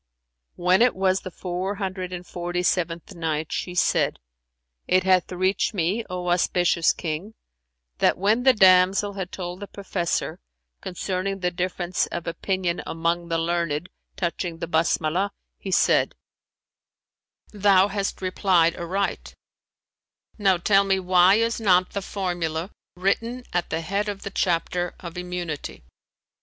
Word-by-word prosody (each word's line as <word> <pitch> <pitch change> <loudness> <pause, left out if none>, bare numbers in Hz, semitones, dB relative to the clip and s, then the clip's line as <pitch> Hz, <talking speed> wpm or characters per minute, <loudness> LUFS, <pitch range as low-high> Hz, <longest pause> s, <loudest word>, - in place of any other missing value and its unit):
When 180 +3 +3
it 245 0 +4
was 190 0 +2
the - - -7
Four 185 +2 -4
Hundred 185 -2 -4
and 180 0 -6
Forty 175 0 -3
seventh 175 0 -1
Night, 160 -3 -2
She 180 - -3
said, - - +2 0.7
It 185 0 +3
hath 185 -1 +3
reached 185 +4 0
me, 190 +6 0
O 180 -1 -3
auspicious 175 -1 +3
King, 170 +7 -5 0.6
that - - +3
when 210 +5 +2
the 260 +1 +6
damsel 190 0 +5
had 190 -2 -5
told 180 -1 -6
the 205 - -7
professor 190 -4 -3 0.4
concerning 185 +2 -3
the 180 -1 +1
difference 180 0 -1
of 170 - -5
opinion 180 0 -2
among 170 +1 -1
the 165 -1 0
learned 170 -1 -1 0.3
touching 170 -1 -3
the 170 - -4
"Basmalah," 170 +3 +1 0.3
he 195 - -6
said, 185 - +3 1.4
"Thou 200 -2 +4
hast 195 -1 -3
replied 185 -3 +3
aright: 190 +4 -3 1.0
now 195 -3 +4
tell 195 +3 +4
me 195 -1 +1
why 185 +1 +5
is 230 +1 0
not 185 -3 +3
the 200 - -3
formula 175 -3 -3 0.2
written 230 +7 -1
at 175 -1 0
the 160 +1 -2
head 200 +5 -1
of 200 -1 -6
the 200 - -5
chapter 175 -1 0
of 170 -2 -8
Immunity[FN#367]?" 180 - -5
180 Hz, 140 wpm, -24 LUFS, 175-195 Hz, 1.4 s, the